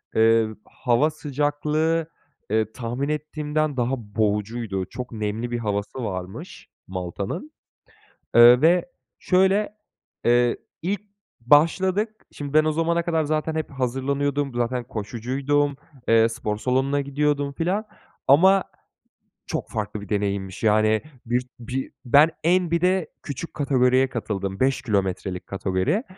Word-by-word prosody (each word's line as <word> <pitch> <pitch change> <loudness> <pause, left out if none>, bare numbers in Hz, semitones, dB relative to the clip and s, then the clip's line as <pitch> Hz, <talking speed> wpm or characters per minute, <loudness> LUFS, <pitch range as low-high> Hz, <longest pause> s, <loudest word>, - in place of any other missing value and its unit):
Eee, 115 0 +4 0.2
hava 125 +5 +1
sıcaklığı, 150 +2 -1 0.4
eee, 110 0 +1
tahmin 125 +4 -3
ettiğimden 150 -1 -2
daha 120 +1 +1
boğucuydu. 105 -2 -2
Çok 125 -1 -7
nemli 110 +2 -3
bir 120 - -1
havası 105 +3 -3
varmış 95 -2 -7 0.2
Malta'nın, 95 - -5 0.8
eee, 120 +2 +9
ve, 175 +5 +4 0.3
şöyle, 195 +3 +2 0.5
eee, 120 0 +3 0.3
ilk 195 +4 -1 0.4
başladık, 185 - +3 0.2
şimdi, 145 0 -7
ben 155 0 +6
o 155 - +1
zamana 170 +2 +1
kadar 165 -2 0
zaten 155 +1 -1
hep 160 -1 -3
hazırlanıyordum, 140 +2 -1
zaten 120 0 -1
koşucuydum, 130 +6 -1 0.3
eee, 115 0 +5
spor 115 -2 -3
salonuna 135 +4 +1
gidiyordum 140 0 0
filan, 185 +9 -1 0.4
ama 190 +7 +6 0.8
çok - - -3
farklı 105 -1 -4
bir 100 - -10
deneyimmiş 100 -2 -2
yani 110 0 +3 0.2
bir 120 +2 0 0.2
bir 125 +3 -4
ben 145 +6 +6
en 175 0 +2
bir 170 - +1
de 180 -2 +2 0.2
küçük 145 +3 -6
kategoriye 130 -2 +3
katıldım, 100 -5 -3
5 130 -1 +2
kilometrelik 95 -5 -2
kategoriye. 95 - 0
130 Hz, 120 wpm, -24 LUFS, 110-155 Hz, 0.8 s, eee